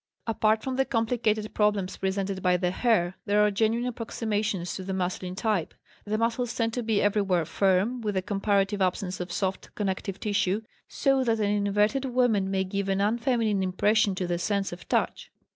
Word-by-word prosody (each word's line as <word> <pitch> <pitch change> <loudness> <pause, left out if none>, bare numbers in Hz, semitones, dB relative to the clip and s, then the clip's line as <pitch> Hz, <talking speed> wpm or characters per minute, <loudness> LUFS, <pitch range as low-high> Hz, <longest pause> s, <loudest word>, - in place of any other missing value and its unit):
Apart 220 -1 +1
from 260 -1 -3
the 270 - +4
complicated 225 -3 0
problem 210 -2 +2
presented 190 +1 -3
by 180 0 +3
the 180 0 0
hair, 185 -4 +1
there 205 +1 +3
are 210 - +2
genuine 225 +4 +1
approximations 210 -6 -2
to 190 - -5
the 190 0 -3
masculine 180 0 -3
type. 195 -5 -1 0.3
The 215 +1 -1
muscles 230 +1 -1
tend 225 -1 0
to 245 - -1
be 220 -3 +1
everywhere 195 -5 +2
firm, 195 +8 +1
with 210 -3 -2
a 185 - 0
comparative 200 0 0
absence 185 0 -1
of 180 0 -5
soft 190 +1 -2
connective 195 -1 -3
tissue; 205 -1 0 0.3
so 270 -2 +1
that 230 -1 +2
an 205 -1 +1 0.2
inverted 210 +7 +2
woman 240 -6 +2
may 190 -1 +1
give 195 +1 -3
an 195 0 +1
unfeminine 225 -1 +1
impression 200 +2 +2
to 185 -1 -2
the 175 -1 -1
sense 200 +1 -1
of 175 - -11
touch. - - 0
205 Hz, 180 wpm, -27 LUFS, 190-225 Hz, 0.3 s, the